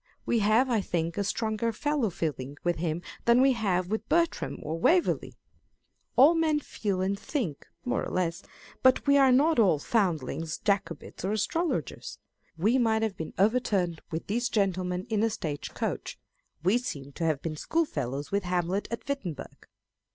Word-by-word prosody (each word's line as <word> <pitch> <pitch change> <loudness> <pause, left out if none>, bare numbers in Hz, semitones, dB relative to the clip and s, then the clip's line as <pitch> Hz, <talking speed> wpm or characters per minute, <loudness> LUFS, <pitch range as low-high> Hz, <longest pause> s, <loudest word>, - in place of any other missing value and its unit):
We 235 - +2
have, 220 +5 +4
I 230 -4 +1
think, 170 -3 -2
a 200 - 0
stronger 220 +2 -1
fellow 285 0 0
feeling 145 -5 -4
with 175 -1 +1
him 165 +1 -2 0.2
than 235 +1 +5
we 270 +1 +5
have 185 -6 0
with 220 - -2
Bertram 335 0 +1
or 160 +2 -3
Waverley. 345 - +2 0.8
All 280 +7 +7
men 320 -2 +2
feel 200 -9 -3
and 195 +1 -1
think, 215 - -3 0.2
more 250 - 0
or - - -4
less: 175 -2 -1 0.4
but 260 -1 +4
we 280 0 +5
are 270 -1 +6
not 290 +3 +4
all 185 -8 +5
foundlings, 165 - -1
Jacobites, 200 -8 -2
or 195 +3 0
astrologers. 325 - -2 0.4
We 220 +10 +3
might 225 -2 +2
have 215 -3 -1
been 160 - -6
overturned 195 -6 +1
with 160 -1 -4
these 240 +4 -1
gentlemen 185 -3 0
in 215 -1 +2
a 225 - +3
stage 155 -9 -5
coach: - - -3 0.5
we 195 +7 +3
seem 140 - -6
to 165 - -5
have 155 -4 0
been 160 -2 -3
schoolfellows 145 - -2
with 200 +1 +1
Hamlet 180 +2 -1
at 235 - -6
Wittenberg. 240 - -5
200 Hz, 165 wpm, -28 LUFS, 170-245 Hz, 0.8 s, All